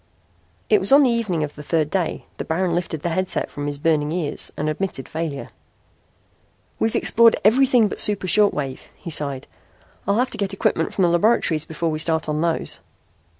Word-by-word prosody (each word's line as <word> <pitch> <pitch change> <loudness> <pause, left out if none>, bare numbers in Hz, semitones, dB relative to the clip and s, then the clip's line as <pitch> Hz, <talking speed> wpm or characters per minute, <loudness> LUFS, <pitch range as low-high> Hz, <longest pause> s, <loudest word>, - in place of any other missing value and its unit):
It 425 - +4
was - - +1
on 280 +1 +7
the 255 - +3
evening 210 -9 -1
of 150 -1 -5
the 150 - -10
third 155 0 -1
day 180 -4 -2
that - - -6
Baron 170 +2 0
lifted 165 -3 -3
the 175 - -1
headset 185 +2 -1
from 145 0 -5
his 145 -1 -3
burning 150 0 0
ears 165 -4 -2
and 150 - -2
admitted 155 -3 -3
failure. 160 -3 -5 1.3
"We've 225 - 0
explored 230 0 +5
everything 245 0 +4
but - - -5
the - - +6
super 205 -3 +1
short 205 +3 +4
waves," 135 -3 -5
he 170 - -8
sighed. 140 -3 -2 0.6
"I'll 200 +1 +2
have 250 +2 0
to - - -6
get 200 -1 -2
equipment 195 - 0
from 190 - 0
the - - +5
laboratories 170 -4 +2
before 160 +1 -3
we 155 - -3
start 160 0 0
on 150 0 -1
those." 165 -1 -1
170 Hz, 195 wpm, -21 LUFS, 155-205 Hz, 1.3 s, on